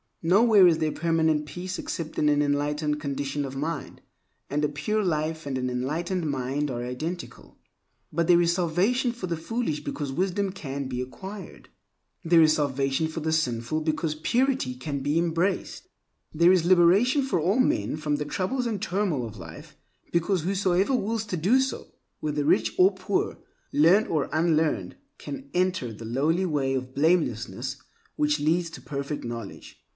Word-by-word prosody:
Nowhere 200 +2 +6
is 165 -2 +4
there 155 -1 0
permanent 160 -2 +1
peace 180 +4 -5
except 160 -2 -5
in 150 - +3
an 145 0 +3
enlightened 150 +1 0
condition 140 0 -3
of 135 0 -7
mind; 155 +5 -4 0.5
and 150 +1 0
a 150 - +2
pure 210 +9 -1
life 160 -3 -1
and 135 -2 -2
an 125 0 -1
enlightened 155 +7 -2
mind 140 +2 -1
are 120 -2 -3
identical. 155 +9 -6 0.5
But 170 +1 0
there 175 -1 +6
is 170 0 +3
salvation 190 +9 +1
for 235 -6 -6
the 170 -2 -2
foolish 170 -2 -3
because 145 -2 -4
wisdom 190 +5 -1
can 140 -7 -5
be 125 -1 -3
acquired. 190 +10 -9 0.5
There 165 -1 +5
is 155 -1 +6
salvation 140 +1 0
for 160 +1 -5
the 160 0 -1
sinful 130 -1 0
because 155 0 -1
purity 235 - 0
can 140 +2 -4
be 145 +3 0
embraced. 170 +3 -1 0.5
There 170 +3 +5
is 180 -3 +3
liberation 190 - +5
for 265 -9 0
all 190 +10 +1
men 105 - +1
from 150 -1 -1
the 150 0 -3
troubles 200 - -2
and 215 -4 -3
turmoil 180 - -1
of 110 -1 -11
life 80 -3 -11 0.4
because 170 +2 +1
whosoever 190 +5 +1
wills 225 -1 -1
to 190 -4 -3
do 200 +12 +3
so—whether 150 - -4
rich 110 -5 +2
or 190 +2 +6
poor, 190 +1 -2 0.3
learned 175 +9 +5
or 155 -4 -1
unlearned—can 175 - -2
enter 180 -10 0
the 115 +2 -9
lowly 150 +10 +1
way 140 -5 0
of 130 0 -4
blamelessness 135 -4 0 0.4
which 150 0 +1
leads 165 +3 +1
to - - -10
perfect 140 0 -4
knowledge. 115 -3 -7
160 Hz, 160 wpm, -26 LUFS, 145-185 Hz, 0.5 s, Nowhere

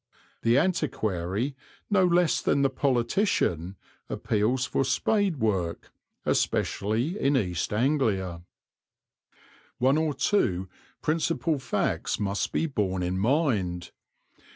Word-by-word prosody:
The 115 +2 +3
antiquary, 125 - -1 0.4
no 195 -2 +4
less 175 -2 +3
than 140 - +2
the 135 - +2
politician, 120 - 0 0.3
appeals 115 +4 0
for 130 +1 0
spade 200 - +1
work, 95 -8 -1 0.3
especially 115 - 0
in 140 0 +2
East 90 -7 -1
Anglia. 105 - 0 1.4
One 135 +4 +3
or 155 -3 0
two 95 - +1 0.4
principal 160 -1 0
facts 130 - -1
must 100 0 -1
be - - 0
borne 95 - -1
in 90 +1 -1
mind. 105 - 0
125 Hz, 105 wpm, -27 LUFS, 95-155 Hz, 1.4 s, no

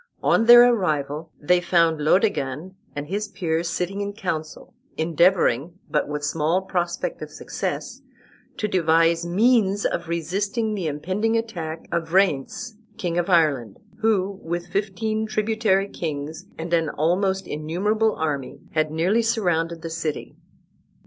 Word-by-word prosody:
On 225 - +3
their 240 +1 +9
arrival 155 -6 -2
they 175 +4 +3
found 165 -3 +2
Laodegan 155 -2 +1 0.2
and 145 0 -4
his 205 +5 -2
peers 170 -2 -2
sitting 180 +4 -2
in 205 0 -3
council, 165 -7 -5 0.2
endeavoring, 170 -2 +2
but 150 - +1
with 150 0 -4
small 160 +5 0
prospect 180 - -2
of - - -6
success, - - -5 0.6
to 210 - -1
devise 165 -2 +2
means 205 +1 +3
of 170 - -1
resisting 200 +7 -1
the 190 -6 -2
impending 190 +10 -1
attack 170 -8 -5
of 170 -1 -2
Ryence, 195 - +1 0.2
king 175 -5 -1
of 175 - -1
Ireland, 145 - +2 0.2
who, 200 -3 +1
with 175 +1 -4
fifteen 215 +3 -1
tributary 215 -2 +1
kings 155 +1 -5
and 165 +1 -5
an 165 -2 +2
almost 190 +5 0
innumerable 205 +9 0
army, 145 -4 -3
had 155 -1 +1
nearly 175 +9 +2
surrounded 175 -8 0
the 165 - -5
city. 160 -2 -4
175 Hz, 135 wpm, -23 LUFS, 160-205 Hz, 0.6 s, their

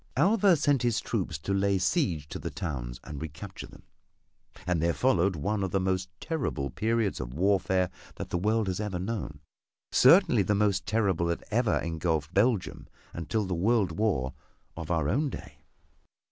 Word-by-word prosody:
Alva 200 -1 +5
sent 145 -3 +2
his 120 -4 +1
troops 75 - -2
to 100 +6 -3
lay 100 0 +2
siege 90 - 0
to - - -6
the - - -4
towns - - -5
and 75 -2 -7
recapture 80 +5 -7
them, - - -16 0.8
and 90 -3 0
there 85 0 +1
followed 95 -7 +2
one 100 +7 -1
of 95 - -1
the 95 - 0
most 95 0 -1
terrible 130 - -2
periods 110 - 0
of 60 0 -6
warfare 95 0 +2 0.2
that - - -7
the - - +1
world 110 +3 +1
has 95 -1 -2
ever 105 -4 -2
known 90 -7 -4 0.5
certainly - - +6
the 105 - +1
most 100 -3 +1
terrible 95 -5 +1
that 85 - -2
ever 115 0 +2
engulfed 80 -1 -2
Belgium 105 0 +1 0.3
until 105 +6 -2
the 95 - -2
World 100 +1 +2
War 80 -13 0 0.4
of 80 -2 -7
our 80 -4 +1
own 145 - +1
day. - - -9
95 Hz, 170 wpm, -28 LUFS, 85-110 Hz, 0.8 s, certainly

